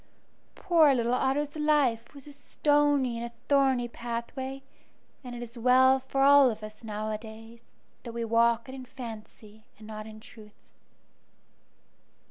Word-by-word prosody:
Poor 315 -6 +4
little 240 0 0
Otto's 275 +3 -1
life 290 -6 0
was 280 - -12
a 295 - -11
stony 290 -3 +1
and 235 - -4
a 235 - -15
thorny 265 -3 +2
pathway, 240 +3 -6 0.6
and 245 -1 -8
it 240 - -6
is 235 0 -11
well 260 +2 +5
for 270 +1 -1
all 280 -1 +7
of 215 -2 -6
us 215 +1 -10
nowadays 220 +1 -7 0.4
that 235 - -8
we 230 0 -4
walk 230 +1 +2
it 260 - -9
in 265 -1 -8
fancy 220 -4 -11 0.2
and 215 - -14
not 215 0 -8
in 215 0 -11
truth. 215 -1 -17
240 Hz, 145 wpm, -28 LUFS, 225-270 Hz, 0.6 s, all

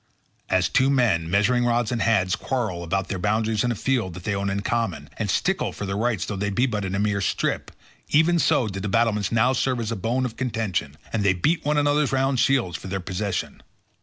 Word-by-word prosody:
As - - +2
two 135 +1 +2
men, 110 -12 +2
measuring 105 +6 +2
rods 120 -1 +1
in 120 - -1
hand, 95 -6 +2
quarrel 110 -10 -2
about 95 +3 -2
their 95 - -3
boundaries 110 +2 +1
in 120 - +1
a - - -1
field 115 -7 -1
that 90 - -9
they 100 - -1
own 100 0 -1
in 100 +1 -1
common, 95 -11 -2
and - - -2
stickle - - 0
for 105 - -6
their 100 0 -3
rights 110 -4 0
though 105 - -4
they 100 +1 -1
be 120 +6 +1
but 105 -5 -2
in 95 0 -2
a - - 0
mere 105 -1 0
strip, - - -1 0.4
even 170 +3 +4
so 125 -6 +2
did 95 -1 -5
the 105 - -3
battlements 105 -2 +1
now 120 +3 +3
serve 130 -1 0
as 115 -1 -3
a - - -1
bone 120 +6 -1
of 115 -2 -5
contention, 105 - -2 0.2
and 115 - 0
they 95 -2 +4
beat 155 - 0
one 150 +1 +1
another's 145 0 +2
round 135 -1 +1
shields 120 -11 +2
for - - -10
their 95 +1 -3
possession. 95 +2 -3
110 Hz, 230 wpm, -24 LUFS, 95-125 Hz, 0.4 s, even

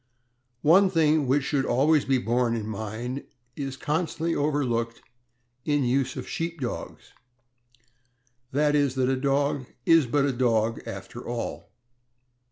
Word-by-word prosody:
One 185 +6 +6
thing 155 -4 +2
which 135 +2 +2
should 140 -1 0
always 145 +4 +3
be 135 -1 +2
borne 120 -1 +1
in 110 -2 -3
mind 110 +5 -5 0.3
is 135 -2 -5
constantly 160 +3 -1
overlooked 125 -7 -1 0.6
in 145 0 +1
use 130 +1 0
of - - -6
Sheep 170 -2 -4
Dogs, 125 -3 -6 1.4
i. 135 - -4
e., 145 -1 +3
that 130 -1 0
a 135 - +2
dog 140 0 0 0.2
is 165 -5 +5
but 140 +3 +2
a 140 - 0
dog 115 -2 +1
after 95 +5 -7
all. 120 -1 -5
135 Hz, 135 wpm, -26 LUFS, 120-150 Hz, 1.4 s, One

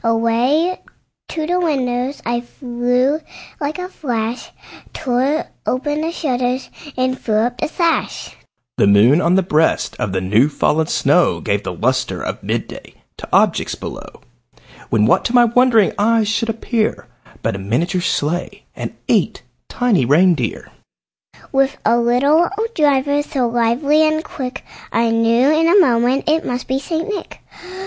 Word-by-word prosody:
Away 235 +10 +1 0.5
to 315 -1 -3
the 355 +3 0
window 260 -6 -1
I 235 0 -1
flew 245 +3 -1 0.4
like 295 +2 -3
a 360 0 -5
flash, 240 -9 -4 0.4
Tore 265 +5 0 0.2
open 290 +4 -1
the 325 +1 -2
shutters 255 -5 -2 0.3
and 255 0 0
threw 215 - -1
up 245 0 -4
the - - -1
sash. 335 +1 -1 0.4
The - - +3
moon 110 - +5
on 175 +1 +2
the 190 - +3
breast 160 -2 +1
of 100 - -2
the 95 - -1
new 105 +9 +2
fallen 155 +1 0
snow - - +2
Gave - - -1
the - - -5
lustre - - -1
of - - -5
mid - - -2
day - - -12 0.2
to - - -10
objects - - +2
below, - - -9 0.7
When, 105 -1 +2
what - - +3
to 235 - -1
my 240 -1 +7
wondering 235 -3 +3
eyes 220 +1 +2
should 225 +1 -1
appear, 225 0 -2 0.4
But - - -1
a - - -5
miniature 165 - -1
sleigh, 175 0 -2
and - - -6
eight - - +1 0.3
tiny 240 - +1
reindeer, 165 +7 +1 0.8
With 270 0 +1
a 235 +2 +3
little 280 +8 +3
old 450 +2 -3
driver, 285 - +2
so 270 -4 -1
lively 240 +6 +2
and 310 0 0
quick, 260 -3 -7 0.3
I 230 0 +1
knew 230 +4 +3
in 325 +1 +2
a 375 +4 +5
moment 250 -3 +2
it 315 +1 +2
must 250 0 -4
be 265 +1 0
St. 320 +3 -3
Nick. 420 -1 -6
245 Hz, 155 wpm, -18 LUFS, 225-290 Hz, 0.8 s, my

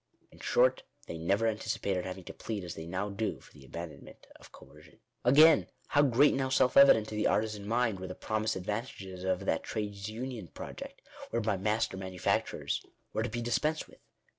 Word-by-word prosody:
In - - -17
short, - - +3 0.2
they 85 - -6
never 100 +7 +1
anticipated 100 -4 -1
having 95 0 -6
to - - -9
plead 105 -4 -5
as 85 -1 -5
they 80 +1 -8
now 95 +4 -2
do 105 +2 -2
for - - -19
the 75 - -15
abandonment 85 +4 -9
of - - -16
coer - - -15
cion. - - -19 0.3
Again, 155 +6 +7 0.2
how 145 - +4
great 140 +1 +5
and 135 - 0
how 130 - 0
self 130 -1 +3
evident 135 -6 +7
to 110 - -5
the 105 - +2
artisan 105 -2 0
mind, 115 -3 +1
were 95 - -5
the - - -6
promised 110 0 -1
advantages 95 -2 -5
of 95 -1 -1
that - - +1
trades 105 -2 -4
union 115 -3 -5
project, - - -9 0.3
whereby 110 -4 0
master 105 0 0
manufacturers 95 -1 -1 0.3
were 110 - 0
to 120 - -1
be 120 +2 -3
dispensed 150 +7 0
with - - -19
105 Hz, 190 wpm, -31 LUFS, 95-120 Hz, 0.3 s, Again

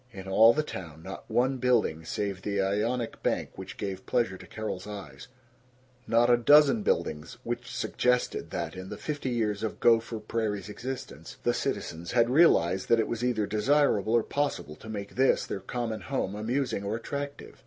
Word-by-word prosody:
In 95 -3 -9
all 110 +4 +7
the 155 +5 0
town 80 - -8
not 95 +2 -8
one 130 +2 +2
building 120 -10 +1
save 100 +1 -3
the 100 0 -2
Ionic 110 +5 -1
bank - - -1
which 95 0 -8
gave 95 -2 -5
pleasure 120 -6 +1
to - - -12
Carol's 105 -3 -5
eyes; 90 -10 -8 0.8
not 115 +1 +4
a 120 0 +5
dozen 150 - +6
buildings 80 - -1
which 120 0 -4
suggested 125 0 0
that, - - -4
in 95 +1 -7
the - - -6
fifty 145 -3 -3
years 110 -4 -1
of 110 - -3
Gopher 115 0 +3
Prairie's 105 -2 -2
existence, 130 +4 -7
the - - +2
citizens 85 +2 -3
had 120 0 +3
realized 95 - +4
that 115 - +5
it 110 - +1
was 120 0 -3
either 120 -4 +1
desirable 110 -1 +2
or 120 -1 +4
possible 140 - -2
to 110 - -11
make 100 -2 -5
this, 130 +1 +3
their - - -4
common 115 +2 -4
home, 130 -8 -2
amusing 115 +1 -1
or 100 +2 -2
attractive. 140 +4 -6
110 Hz, 175 wpm, -28 LUFS, 100-125 Hz, 0.8 s, all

